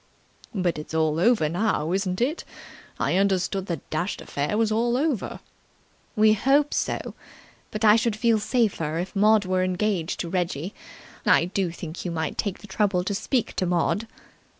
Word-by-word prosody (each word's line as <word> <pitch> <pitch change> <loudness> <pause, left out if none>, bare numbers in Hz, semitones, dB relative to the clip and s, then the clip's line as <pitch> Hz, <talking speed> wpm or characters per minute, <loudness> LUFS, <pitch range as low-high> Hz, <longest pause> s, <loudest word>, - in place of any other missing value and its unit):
"But 180 -5 0
it's 155 +1 -7
all 160 0 +1
over 210 -4 +3
now, 170 -2 0
isn't 185 +1 -1
it? 290 +7 0 0.6
I - - +1
understood 195 0 +1
the 170 - -3
dashed 170 +5 -2
affair 145 +9 -2
was 225 -1 +2
all 235 +2 +1
over." 280 -6 -1 0.7
"We 215 0 +5
hope 275 +7 +2
so. - - -2 0.6
But 215 +1 -2
I 210 +1 +7
should 230 -1 0
feel 225 0 +2
safer 205 - 0
if 180 +4 -4
Maud 210 0 +4
were 185 0 +1
engaged 185 -2 -1
to 170 - -4
Reggie. 175 0 -2 0.5
I - - +4
do 185 0 -1
think 165 0 -7
you 180 - -3
might 160 -2 -2
take 200 -3 -2
the - - -11
trouble 195 -2 +1
to 200 - -2
speak 220 +4 -1
to 185 - +1
Maud." 180 +5 0
195 Hz, 170 wpm, -25 LUFS, 175-220 Hz, 0.7 s, I